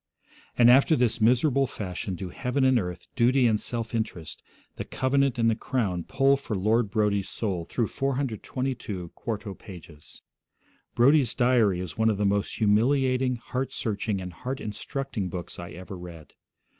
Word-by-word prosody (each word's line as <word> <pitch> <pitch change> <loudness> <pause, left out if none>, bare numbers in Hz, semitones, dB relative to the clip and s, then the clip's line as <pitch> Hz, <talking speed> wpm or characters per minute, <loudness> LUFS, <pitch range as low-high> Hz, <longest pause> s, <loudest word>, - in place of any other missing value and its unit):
And 120 0 +7
after 140 +5 +5
this 120 -4 +1
miserable 130 +4 +3
fashion 95 -4 -5
do 90 +1 -6
heaven 125 +7 -1
and 130 -2 +4
earth, 90 -3 -5
duty 130 +1 +3
and 110 -3 +3
self 115 -1 -4
interest, 110 -8 -4 0.4
the - - -3
covenant 135 0 +1
and 115 -1 +2
the 115 - +4
crown 105 -8 -2
pull 135 0 +3
for 125 -5 -4
Lord 110 +3 +1
Brodie's 100 -1 0
soul 95 -7 -2
through 120 - 0
422 130 -7 -3
quarto 105 -1 -5
pages. 85 -6 -13 0.7
Brodie's 130 0 +4
diary 120 -7 +3
is 90 -2 -6
one 110 0 +4
of 105 - 0
the 105 - 0
most 100 0 0
humiliating, 125 +4 +2
heart 125 +2 -4
searching, 105 -2 -2
and 90 -1 -7
heart 130 +8 -5
instructing 110 -1 -4
books 90 0 -7
I 85 0 -7
ever 90 +3 -9
read. 85 -3 -11
115 Hz, 155 wpm, -26 LUFS, 95-130 Hz, 0.7 s, And